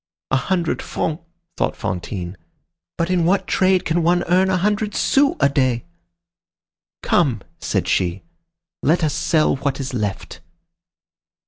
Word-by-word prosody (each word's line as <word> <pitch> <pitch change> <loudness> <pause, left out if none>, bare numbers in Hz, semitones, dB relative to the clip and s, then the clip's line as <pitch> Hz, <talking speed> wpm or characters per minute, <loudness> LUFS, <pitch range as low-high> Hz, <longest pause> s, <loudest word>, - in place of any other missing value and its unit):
"A - - +4
hundred 170 +5 0
francs," 160 +1 -3 0.4
thought - - 0
Fantine. 90 0 -4 0.6
"But 170 +2 0
in 180 -2 +2
what 190 +4 +2
trade 185 -1 +2
can 170 +1 +1
one 175 +2 +2
earn 185 +2 +3
a 185 - +2
hundred 210 +3 0
sous 280 +1 +3
a 140 - +5
day?" 130 -4 0 1.2
"Come!" 130 - +2 0.2
said - - -1
she, 90 +1 0 0.6
"let 165 +4 +2
us 150 -3 +1
sell 155 -1 +2
what 140 0 -2
is 135 0 -4
left." 105 -5 -3
160 Hz, 135 wpm, -21 LUFS, 130-180 Hz, 1.2 s, a